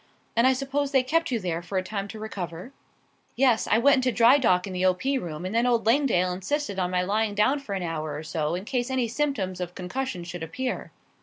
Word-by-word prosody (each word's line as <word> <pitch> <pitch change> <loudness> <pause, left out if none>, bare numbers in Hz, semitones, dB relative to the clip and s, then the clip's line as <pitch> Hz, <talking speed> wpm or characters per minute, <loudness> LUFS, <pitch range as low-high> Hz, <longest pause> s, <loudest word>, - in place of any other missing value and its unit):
"And 230 +2 +5
I 265 - +5
suppose 275 +2 -1
they 265 -2 +4
kept 330 +5 +1
you 240 -3 0
there 175 -4 -2
for 190 +2 -4
a 185 - +1
time 200 +1 -4
to 220 - -9
recover?" 190 -1 -6 0.6
"Yes; 250 -3 +3
I 215 - +4
went 275 +4 +5
into 255 -1 +1
dry 240 +4 +6
dock 185 -8 +3
in 195 - -6
the 180 0 -2
O. 185 -1 +4
P. 270 +8 -1
room, 170 -2 -6
and 185 - -4
then 235 +2 +2
old 235 -2 +2
Langdale 225 -7 +3
insisted 200 +2 -2
on 180 -1 0
my 180 0 +1
lying 210 +2 0
down 235 +8 +3
for 210 -8 -5
an 190 - -3
hour 155 -3 -3
or 150 - -6
so 155 0 -2
in 185 +3 -5
case 245 +1 -1
any 260 -2 0
symptoms 220 -9 -2
of 180 0 -5
concussion 185 +1 -4
should 175 0 -7
appear. 250 +11 -4
215 Hz, 240 wpm, -26 LUFS, 180-260 Hz, 0.6 s, dry